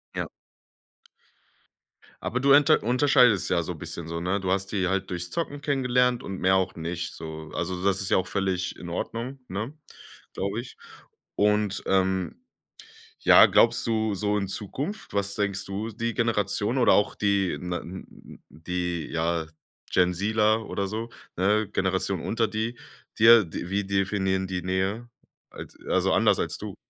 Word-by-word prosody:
Ja. -, -, -2 dB, 2.0 s
Aber 125 Hz, -, -1 dB
du 140 Hz, +1 st, +5 dB
unter 150 Hz, +2 st, +5 dB
unterscheidest 125 Hz, -3 st, +4 dB
ja -, -, +3 dB
so -, -, -4 dB
'n -, -, -11 dB
bisschen 85 Hz, -1 st, -6 dB
so, 85 Hz, 0 st, -4 dB
ne? 90 Hz, +4 st, -1 dB
Du 95 Hz, -1 st, -2 dB
hast 95 Hz, 0 st, 0 dB
die 95 Hz, -3 st, 0 dB
halt 95 Hz, +1 st, -1 dB
durchs 90 Hz, 0 st, -3 dB
Zocken 145 Hz, -4 st, -4 dB
kennengelernt 125 Hz, -3 st, +1 dB
und 95 Hz, -1 st, -6 dB
mehr 95 Hz, +1 st, +3 dB
auch 95 Hz, -1 st, +1 dB
nicht, 85 Hz, +1 st, -4 dB
so. 80 Hz, -1 st, -8 dB
Also, 90 Hz, +1 st, -2 dB
so 90 Hz, +2 st, -5 dB
das 100 Hz, 0 st, +2 dB
ist 95 Hz, -, -2 dB
ja -, -, +4 dB
auch 95 Hz, -, -1 dB
völlig 95 Hz, -3 st, -1 dB
in 85 Hz, -, -9 dB
Ordnung, 120 Hz, +9 st, -4 dB
ne 105 Hz, +8 st, -4 dB, 0.6 s
glaube 100 Hz, +4 st, -2 dB
ich. 120 Hz, -, -13 dB, 0.6 s
Und, 105 Hz, -2 st, +1 dB
ähm, 95 Hz, -2 st, 0 dB, 0.8 s
ja -, -, +8 dB
glaubst 115 Hz, 0 st, +4 dB
du 110 Hz, -2 st, 0 dB
so 105 Hz, +1 st, 0 dB
in 100 Hz, -2 st, -2 dB
Zukunft 130 Hz, -, -5 dB
was 100 Hz, 0 st, -1 dB
denkst 100 Hz, -1 st, -2 dB
du? 100 Hz, +3 st, -4 dB
Die 115 Hz, +1 st, -3 dB
Generation 105 Hz, 0 st, 0 dB
oder 125 Hz, -, +5 dB
auch 105 Hz, -, +2 dB
die 100 Hz, -3 st, +1 dB
na 90 Hz, -1 st, -3 dB
n 95 Hz, +2 st, -11 dB
die, 90 Hz, 0 st, -4 dB
ja, 85 Hz, -1 st, -1 dB, 0.4 s
GenZ-ler 105 Hz, +5 st, +2 dB
oder 100 Hz, -1 st, -2 dB
so, 110 Hz, +3 st, -4 dB, 0.3 s
ne, 105 Hz, +3 st, +2 dB
Generation 95 Hz, -1 st, 0 dB
unter 115 Hz, 0 st, 0 dB
die 110 Hz, +3 st, -3 dB, 0.4 s
dir, 115 Hz, -1 st, +8 dB
d 85 Hz, +1 st, -6 dB
wie 100 Hz, +1 st, 0 dB
definieren 95 Hz, -1 st, 0 dB
die 90 Hz, -1 st, -3 dB
Nähe? 95 Hz, +6 st, -2 dB, 0.4 s
Als -, -, -10 dB
also, -, -, +2 dB
anders -, -, +3 dB
als -, -, -1 dB
du? -, -, -7 dB
100 Hz, 165 wpm, -26 LUFS, 90-115 Hz, 2.0 s, ja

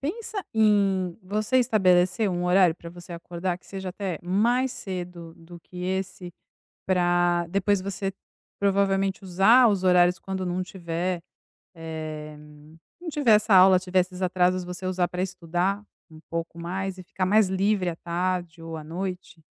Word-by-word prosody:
pensa 415 Hz, +7 st, -4 dB
em, 200 Hz, -4 st, +2 dB
você 215 Hz, +6 st, -1 dB
estabelecer 190 Hz, -4 st, +3 dB
um 175 Hz, 0 st, -2 dB
horário 180 Hz, -1 st, +4 dB
pra 170 Hz, 0 st, -11 dB
você 175 Hz, +1 st, -11 dB
acordar, 175 Hz, +1 st, -4 dB
que -, -, -25 dB
seja 190 Hz, -1 st, -6 dB
até 185 Hz, -2 st, -4 dB
mais 235 Hz, +8 st, +1 dB
cedo 175 Hz, -5 st, -7 dB
do 170 Hz, +1 st, -13 dB
que 180 Hz, +1 st, -10 dB
esse, 185 Hz, -1 st, -4 dB, 0.6 s
pra 175 Hz, -1 st, +2 dB
depois 195 Hz, +1 st, +1 dB
você 195 Hz, 0 st, -3 dB, 0.5 s
provavelmente 195 Hz, 0 st, +1 dB
usar 195 Hz, +7 st, +5 dB
os 195 Hz, -3 st, 0 dB
horários 180 Hz, -1 st, +4 dB
quando 190 Hz, +1 st, -5 dB
não 180 Hz, 0 st, -2 dB
tiver, 175 Hz, -1 st, -3 dB, 0.5 s
eh, 155 Hz, -2 st, -7 dB, 0.6 s
não 355 Hz, -, -5 dB
tiver 290 Hz, -6 st, +2 dB
essa 210 Hz, -1 st, +2 dB
aula, 185 Hz, 0 st, +8 dB
tiver 185 Hz, 0 st, +1 dB
esses 180 Hz, 0 st, -3 dB
atrasos, 180 Hz, 0 st, +1 dB
você 180 Hz, +1 st, -7 dB
usar 185 Hz, -1 st, 0 dB
pra 180 Hz, -, -3 dB
estudar 185 Hz, +2 st, -2 dB, 0.3 s
um 160 Hz, -1 st, -14 dB
pouco 165 Hz, 0 st, -4 dB
mais 190 Hz, +2 st, -4 dB
e 185 Hz, -, -9 dB
ficar 185 Hz, 0 st, -3 dB
mais 210 Hz, 0 st, +4 dB
livre 190 Hz, -1 st, +1 dB
à 165 Hz, -, -5 dB
tarde 175 Hz, -1 st, -3 dB
ou 165 Hz, 0 st, -6 dB
à 155 Hz, -, -9 dB
noite? 180 Hz, 0 st, -6 dB
185 Hz, 155 wpm, -25 LUFS, 175-195 Hz, 0.6 s, aula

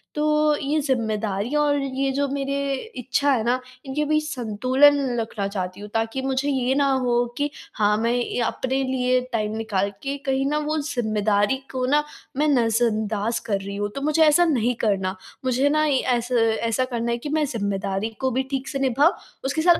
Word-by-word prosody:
तो 300 Hz, 0 st, +3 dB
ये 295 Hz, +2 st, 0 dB
ज़िम्मेदारियाँ 225 Hz, -1 st, 0 dB
और 290 Hz, -1 st, +2 dB
ये 270 Hz, 0 st, -1 dB
जो 280 Hz, +1 st, 0 dB
मेरे 275 Hz, 0 st, -1 dB, 0.2 s
इच्छा 280 Hz, +3 st, +1 dB
है 240 Hz, -5 st, +2 dB
ना, 245 Hz, +3 st, +1 dB, 0.3 s
इनके 275 Hz, +3 st, -1 dB
बीच 305 Hz, +1 st, +1 dB
संतुलन 255 Hz, +3 st, +3 dB, 0.2 s
रखना 220 Hz, -3 st, -3 dB
चाहती 185 Hz, -2 st, -4 dB
हूँ 210 Hz, -, -8 dB
ताकि 225 Hz, +3 st, -1 dB
मुझे 265 Hz, +1 st, -1 dB
ये 265 Hz, -1 st, +1 dB
ना 280 Hz, 0 st, +3 dB
हो 245 Hz, -2 st, +2 dB
कि 290 Hz, 0 st, 0 dB, 0.2 s
हाँ, 210 Hz, 0 st, +2 dB
मैं 230 Hz, +2 st, +1 dB
ये 245 Hz, 0 st, -1 dB
अपने 260 Hz, +3 st, -1 dB
लिए 255 Hz, -1 st, +1 dB
टाइम 215 Hz, -1 st, -1 dB
निकाल 205 Hz, -3 st, 0 dB
के 275 Hz, 0 st, -2 dB
कहीं 270 Hz, 0 st, +1 dB
ना 300 Hz, -, +1 dB
वो 300 Hz, +1 st, -1 dB
ज़िम्मेदारी 215 Hz, -4 st, +1 dB
को 255 Hz, -1 st, -1 dB
ना 295 Hz, +3 st, +3 dB, 0.3 s
मैं 300 Hz, +2 st, +2 dB
नज़रअंदाज़ 225 Hz, -4 st, +1 dB
कर 205 Hz, -3 st, 0 dB
रही 200 Hz, +1 st, -6 dB
हूँ 205 Hz, 0 st, -2 dB
तो 275 Hz, -, -4 dB
मुझे 305 Hz, +2 st, +3 dB
ऐसा 310 Hz, +3 st, +5 dB
नहीं 250 Hz, -7 st, +2 dB
करना। 195 Hz, -2 st, 0 dB, 0.3 s
मुझे 260 Hz, +2 st, +2 dB
ना 305 Hz, +1 st, +2 dB
ये 280 Hz, -4 st, +2 dB, 0.2 s
ऐसा 240 Hz, +1 st, -2 dB, 0.3 s
ऐसा 255 Hz, +3 st, +1 dB
करना 235 Hz, -2 st, -2 dB
है 235 Hz, -, 0 dB
कि 265 Hz, +5 st, -6 dB
मैं 310 Hz, +1 st, +1 dB
ज़िम्मेदारी 200 Hz, -3 st, -2 dB
को 260 Hz, -1 st, 0 dB
भी 265 Hz, -, +2 dB
ठीक 270 Hz, 0 st, -2 dB
से 275 Hz, -, -3 dB
निभाऊँ, 270 Hz, +5 st, +4 dB, 0.3 s
उसके 285 Hz, +4 st, 0 dB
साथ 345 Hz, +1 st, +5 dB
255 Hz, 190 wpm, -23 LUFS, 220-280 Hz, 0.3 s, ऐसा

